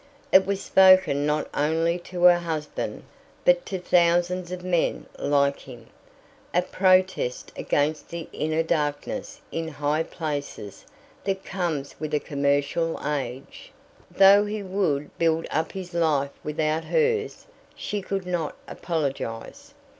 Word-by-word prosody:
It 190 0 +6
was 200 -1 0
spoken 185 -7 +5
not 150 0 0
only 165 +4 +1
to 180 -1 -4
her 175 -1 +7
husband, 160 -3 -4 0.4
but - - +4
to 190 - -3
thousands 175 0 +2
of 180 -1 -6
men 180 -2 0
like 140 -1 +2
him 120 -3 -12 0.7
a 180 - +4
protest 185 -8 +1
against 150 +2 -1
the 170 -1 -6
inner 155 +1 0
darkness 165 - -2
in 165 0 -3
high 150 0 -1
places 145 - -5 0.4
that 195 -1 -2
comes 170 -7 -3
with 155 -1 -2
a - - +2
commercial 145 +4 0
age. 135 -3 -5 0.4
Though 195 +1 +6
he 210 0 -4
would 180 -7 -1
build 165 -1 +2
up 160 +2 -1
his 185 -2 -7
life 150 -5 +1
without 155 +1 -1
hers, 460 -2 0 0.3
she 205 -1 -4
could 195 0 -3
not 175 -4 -2
apologize. 160 - -4
165 Hz, 130 wpm, -25 LUFS, 150-185 Hz, 0.7 s, her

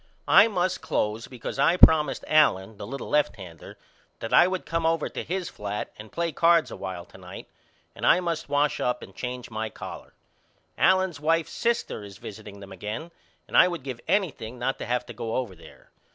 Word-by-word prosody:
I - - +8
must 185 -4 -1
close 105 +2 -1
because 125 +1 -7
I 165 +6 +4
promised 160 -3 +5
Allen 110 -10 +3
the 100 - -7
little 135 +4 -6
lefthander 100 - -2 0.4
that 115 - -5
I - - +7
would 185 0 -3
come 165 +2 -1
over 165 -1 +1
to - - -5
his 180 +1 -3
flat 105 - -5
and 105 0 -11
play 170 -1 -1
cards 170 0 +3
a - - -6
while 95 -3 -6
to - - -16
night - - -10 0.5
and - - -10
I - - +5
must 170 -4 -3
wash 145 +1 +1
up 125 0 -1
and 95 - -13
change 125 -1 -6
my 110 0 -3
collar. - - -9 0.6
Allen's 185 -4 +3
wife's 165 +2 +1
sister 235 - -1
is 100 -1 -11
visiting 100 -1 -10
them 100 -1 -11
again 105 - -6 0.4
and - - -7
I - - +8
would 170 -6 -5
give 130 -3 -6
anything 140 - -1
not 130 +2 -2
to - - -5
have 125 +1 0
to 120 - -9
go 115 0 -4
over 125 -7 -2
there. 85 - -17
130 Hz, 195 wpm, -26 LUFS, 105-165 Hz, 0.6 s, I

